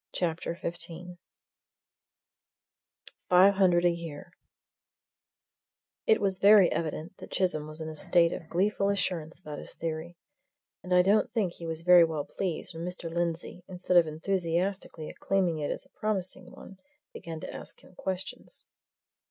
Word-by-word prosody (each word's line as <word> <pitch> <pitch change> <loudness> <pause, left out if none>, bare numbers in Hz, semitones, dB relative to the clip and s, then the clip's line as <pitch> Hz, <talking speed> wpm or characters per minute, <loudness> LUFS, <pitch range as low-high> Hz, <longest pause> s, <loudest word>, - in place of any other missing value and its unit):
CHAPTER 170 -1 -2
XV 175 +1 -4 2.1
FIVE 185 +2 +7
HUNDRED 180 -3 +3
A 175 - +5
YEAR 170 -1 -7 1.8
It 220 - +5
was 195 -2 0
very 200 -2 +7
evident 160 +3 -3
that - - -11
Chisholm 165 -5 0
was 155 +1 -10
in 160 - -4
a 155 - -6
state 170 +2 +4
of 160 - -8
gleeful 200 +3 +1
assurance 175 -5 -1
about 150 -5 -8
his - - -5
theory, 165 +1 -5 0.6
and 180 - -10
I 180 0 +6
don't 205 +3 +3
think 200 -7 0
he 170 - -7
was 160 0 -2
very 175 0 +7
well 160 -3 -1
pleased 180 -4 -3
when 165 +1 -6
Mr. 175 -1 -5
Lindsey, 170 +1 -2
instead 180 0 -2
of 170 -2 +6
enthusiastically 170 0 -1
acclaiming 185 -5 0
it 145 - -2
as - - -4
a - - -25
promising 195 -4 -2
one, 195 - -13 0.3
began 165 -3 -7
to - - -7
ask - - -9
him - - -18
questions. 190 +1 -5
175 Hz, 150 wpm, -29 LUFS, 165-185 Hz, 2.1 s, FIVE